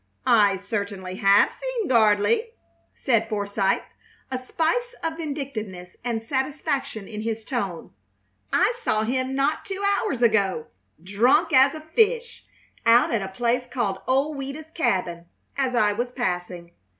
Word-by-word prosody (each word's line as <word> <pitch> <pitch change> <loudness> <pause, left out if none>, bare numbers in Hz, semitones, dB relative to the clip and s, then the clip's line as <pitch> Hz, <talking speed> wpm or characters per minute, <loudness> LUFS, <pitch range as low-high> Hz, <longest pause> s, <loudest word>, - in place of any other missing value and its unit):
"I 205 -4 +4
certainly 200 -2 -4
have 200 +1 +5
seen - - -3
Gardley," 235 - +3 0.4
said 225 -4 +1
Forsythe, 200 -2 0 0.5
a 255 - -2
spice 485 - -1
of 325 0 -2
vindictiveness 250 - -5
and 230 -2 -2
satisfaction 265 -4 -2
in 215 -1 -6
his 225 0 -3
tone. 200 -10 -4 0.6
"I 390 +6 +3
saw 215 - +1
him 260 +3 -1
not 275 +3 0
two 390 0 -5 0.2
hours 265 - -2
ago, 200 -8 +2 0.4
drunk 205 +7 +3
as 270 +2 +6
a 310 - -7
fish, 460 +9 0 0.4
out 230 +1 +5
at 225 - +1
a 195 - -3
place 240 +5 -1
called 205 -7 -2
Old 275 +3 +1
Ouida's 275 +4 -7
Cabin, 180 - -1 0.3
as 265 -2 0
I 210 -3 +3
was 240 +3 -3
passing. 180 -7 -3
240 Hz, 140 wpm, -24 LUFS, 200-285 Hz, 0.6 s, as